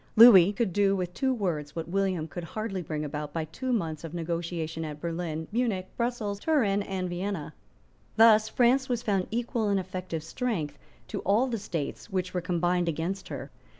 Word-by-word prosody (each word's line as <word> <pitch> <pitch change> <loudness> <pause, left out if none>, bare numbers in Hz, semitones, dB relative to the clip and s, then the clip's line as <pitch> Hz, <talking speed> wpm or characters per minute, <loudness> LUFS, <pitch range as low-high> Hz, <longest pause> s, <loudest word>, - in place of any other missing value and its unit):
Lewis 205 -4 +9
could 205 -4 0
do 200 0 +3
with 180 -2 -3
two 265 +5 +1
words 170 - -2
what 165 -1 -4
William 185 -3 0
could 175 +1 -6
hardly 195 +1 -4
bring 155 -2 -3
about 150 0 -4
by 165 -1 -1
two 255 - -4
months 165 -10 -1
of 165 +1 -6
negotiation 165 -1 -3
at 150 -1 -6
Berlin, 165 -1 -3
Munich, 215 -5 0
Brussels, 235 -4 -2
Turin 210 -9 +2
and 190 -2 -3
Vienna. 180 -2 -3 0.6
Thus 220 -1 +6
France 260 +3 +3
was 240 -2 -1
found 195 -3 +1
equal 235 -1 -1
in 200 - +2
effective 185 -3 -4
strength 170 - -3 0.3
to - - -3
all 210 +6 +3
the 240 -4 -2
states 165 -7 -4
which 185 -1 -2
were 180 - -1
combined 175 0 +1
against 175 +5 -3
her. - - -6
185 Hz, 180 wpm, -28 LUFS, 165-215 Hz, 0.6 s, Lewis